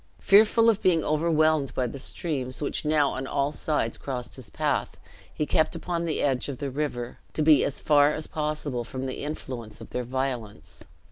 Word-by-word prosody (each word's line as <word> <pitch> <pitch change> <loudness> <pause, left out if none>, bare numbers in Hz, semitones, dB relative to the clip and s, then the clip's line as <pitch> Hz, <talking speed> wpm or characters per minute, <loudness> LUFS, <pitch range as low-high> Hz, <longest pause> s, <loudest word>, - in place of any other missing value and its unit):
Fearful 220 +3 +5
of 220 -2 +3
being 170 -4 +3
overwhelmed 155 -2 +2
by 130 - +1
the 130 +3 -5
streams, 130 -3 -3
which 145 - -2
now 150 -2 +3
on 135 0 -4
all 140 +1 0
sides 150 -6 -1
crossed 125 -3 -5
his 130 -4 -9
path, - - -1 0.3
he 150 - -2
kept 160 +1 +1
upon 170 -1 -2
the 160 - -1
edge 135 -1 0
of 135 - -4
the 140 -2 -4
river, 125 -4 -3
to 155 - 0
be 150 -2 +6
as 140 - -2
far 145 -1 +4
as 155 0 -3
possible 150 -5 -3
from 130 +2 -5
the 130 - -5
influence 130 -6 -6
of - - -11
their 125 - -2
violence. 125 -4 -4
145 Hz, 190 wpm, -26 LUFS, 130-155 Hz, 0.3 s, be